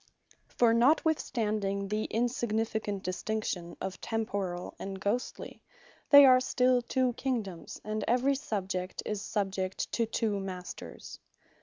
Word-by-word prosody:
For 235 -2 +3
notwithstanding 225 -7 +1
the 215 +1 -1
insignificant 220 -3 -1
distinction 185 -2 -3
of 190 -1 -5
Temporall, 200 -5 -3
and 195 0 -5
Ghostly, 210 +6 -3 0.5
they 285 -1 +10
are 255 -1 +7
still 255 -1 +2
two 255 +1 0
Kingdomes, 225 -10 -4
and 215 0 -3
every 255 +4 +3
Subject 190 -8 -3
is 210 -2 -2
subject 195 -3 -2
to 230 -1 0
two 215 -2 0
Masters. 185 -2 -7
215 Hz, 115 wpm, -30 LUFS, 195-245 Hz, 0.5 s, they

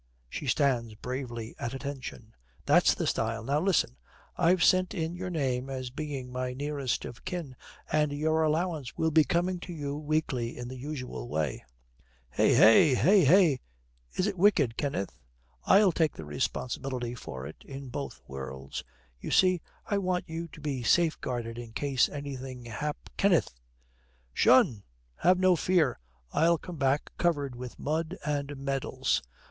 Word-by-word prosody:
She 140 - -6
stands 120 -5 +1
bravely 120 -1 -5
at 120 +2 -3
attention. 135 -5 -7 0.3
'That's - - +5
the - - -2
style. - - -1
Now 140 +5 +1
listen, 180 - +1 0.4
I've 180 +1 +3
sent 185 -1 +4
in 165 -2 -2
your 180 +1 -4
name 135 -6 -1
as 130 -2 -4
being 135 -3 -5
my 125 0 -3
nearest 140 -2 -2
of 115 - -9
kin, 170 -8 -5 0.4
and 150 -1 +2
your 155 +2 +1
allowance 155 -4 -1
will 160 0 +1
be 155 0 +6
coming 175 +5 0
to 180 - -8
you 145 -4 -4
weekly 145 -6 -1
in 120 0 -6
the 130 - -7
usual 130 -3 -6
way.' 75 -2 -2 0.7
'Hey! - - +3 0.4
hey! 185 - +5
hey! 165 -3 +5 0.6
Is 185 - +1
it 200 -3 -2
wicked, 165 - +4
Kenneth?' 140 -9 -3 0.5
'I'll 195 -1 +6
take 160 -2 +1
the 80 - -8
responsibility 120 - -3
for 65 - -7
it 75 - -10
in 135 -1 -8
both 140 +3 -6
worlds. 65 -1 -6 0.4
You - - -6
see, 185 -2 +4 0.2
I 200 - 0
want 180 -2 -1
you 165 +1 -5
to - - -14
be 140 -4 -2
safeguarded 120 -4 +1
in 115 -2 -9
case 135 0 +2
anything 135 -3 -6
hap 145 +6 -3
' - - -33
'Kenneth!' 185 - +3 0.8
''Tion! 110 -4 +5 0.4
Have 180 +2 +4
no 185 -1 +4
fear. 170 -5 +2 0.3
I'll 170 +1 +4
come 175 +1 -9
back, 135 +1 +1
covered 145 -7 +1
with 125 0 -8
mud 160 +4 -2
and 145 -1 -2
medals. 135 0 -1
140 Hz, 155 wpm, -29 LUFS, 125-165 Hz, 0.8 s, be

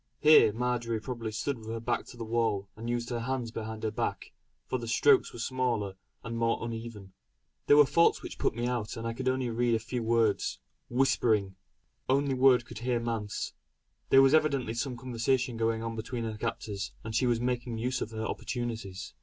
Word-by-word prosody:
Here 155 -7 +7
Marjory 120 0 -1
probably 115 0 -5
stood 120 +4 -2
with 110 - -12
her 115 +1 -3
back 120 +1 -2
to 120 - -12
the 115 - -5
wall 110 -3 0
and 115 +2 -6
used 120 0 -2
her 120 - -1
hands 120 -1 -2
behind 110 -1 -6
her 110 - 0
back, - - -3 0.3
for 130 - -2
the 115 - -6
strokes 145 +5 +4
were - - -10
smaller 115 -5 -1 0.3
and 115 0 -4
more 115 0 +2
uneven. 115 -4 -7 0.5
There 145 - +7
were 150 - +8
faults 170 +5 +3
which - - -8
put - - +1
me 120 +1 -2
out 120 -1 -2
and 115 - -5
I 115 - -1
could 130 +2 -1
only 130 -2 -1
read 120 0 +2
a - - +1
few 120 +2 -4
words 115 -2 +1 0.3
"whispering" 115 -6 +2 0.5
"only 140 +1 +2
word 130 -2 +5
can 120 - -10
hear 120 +1 0
'manse.'" 115 -3 -3 0.6
There 135 0 +7
was 135 +1 +5
evidently 140 -7 +2
some 125 +1 -3
conversation 125 +1 0
going 115 0 0
on 115 0 -3
between 115 +2 -4
her 110 -1 -3
captors, 100 -1 -4
and 110 - -6
she 125 +3 +2
was 120 -1 +2
making 120 -1 -2
use 125 +2 -1
of - - -2
her 110 0 -4
opportunities. 110 -8 -4
115 Hz, 200 wpm, -30 LUFS, 115-125 Hz, 0.6 s, were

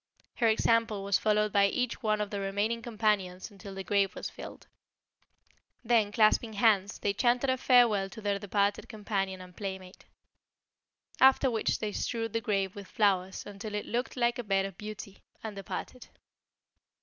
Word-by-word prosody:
Her 235 - +3
example 225 -1 +2
was 200 0 +2
followed 210 -1 +1
by 200 -1 +5
each 250 +3 -2
one 215 -1 +1
of 205 - -3
the 200 - -3
remaining 205 +4 -1
companions 210 -5 -1
until 200 -1 -10
the 195 - -5
grave 195 +1 +1
was - - -5
filled. - - -10 1.2
Then 225 -3 +2
clasping 220 +1 +3
hands, 205 -2 +2
they 200 - -1
chanted 245 +4 +2
a - - +2
farewell 235 -7 +4
to 220 - -10
their 205 -2 -1
departed 200 0 0
companion 195 -3 -3
and 180 -1 -13
playmate. 190 -2 -7 1.1
After 265 0 +5
which 225 -2 0
they 215 -1 -3
strewed 225 0 -3
the 230 - 0
grave 195 -4 -1
with 200 -2 -9
flowers 190 -3 0
until 205 +1 -7
it 210 - -3
looked 245 +3 -3
like 240 0 +1
a - - -2
bed 195 -2 +1
of 195 -2 -7
beauty, 210 -1 -8 0.2
and 220 -2 -6
departed. 200 +5 -7
210 Hz, 165 wpm, -30 LUFS, 195-225 Hz, 1.2 s, by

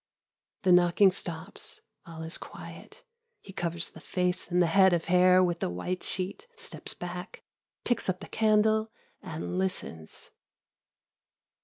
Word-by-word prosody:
The 185 - +4
knocking 180 +2 +6
stops. 175 +1 -5 0.3
All 160 -1 -8
is 160 +1 -2
quiet. - - -11 0.4
He 195 - -13
covers 170 -2 -1
the - - -12
face 180 0 -1
and 175 0 +2
the 175 - +5
head 190 +2 +5
of 170 -1 0
hair 185 +1 +5
with 175 -1 0
the - - -1
white 135 - -3
sheet, 195 - -3
steps 465 -1 -5
back, 180 +2 -7 0.4
picks 240 - 0
up 185 0 -1
the - - -9
candle 220 0 +2 0.3
and 165 +3 -4
listens. 180 - -4
180 Hz, 140 wpm, -29 LUFS, 170-195 Hz, 0.4 s, knocking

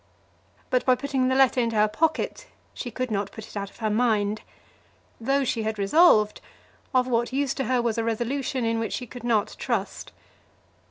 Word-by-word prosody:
But 255 - +2
by 255 - +4
putting 270 -1 -1
the 260 - +1
letter 265 -1 +4
into 230 -1 -1
her 210 0 +4
pocket 325 - -1 0.3
she 245 - -5
could 255 +1 -4
not 200 -1 -1
put 220 -1 -9
it - - -14
out 200 -1 -3
of - - -20
her 220 -2 -1
mind. 215 -2 +1 0.8
Though 275 +4 +1
she 235 -3 -1
had 220 0 -2
resolved, 215 - +4 0.5
of 255 -2 +3
what 240 -1 0
use 275 0 0
to 270 - -3
her 250 0 +1
was 230 -1 0
a - - 0
resolution 240 +3 -1
in 225 0 0
which 225 -2 -3
she 250 - -3
could 245 0 -11
not 225 -4 +1
trust? - - -3
235 Hz, 195 wpm, -25 LUFS, 220-260 Hz, 0.8 s, by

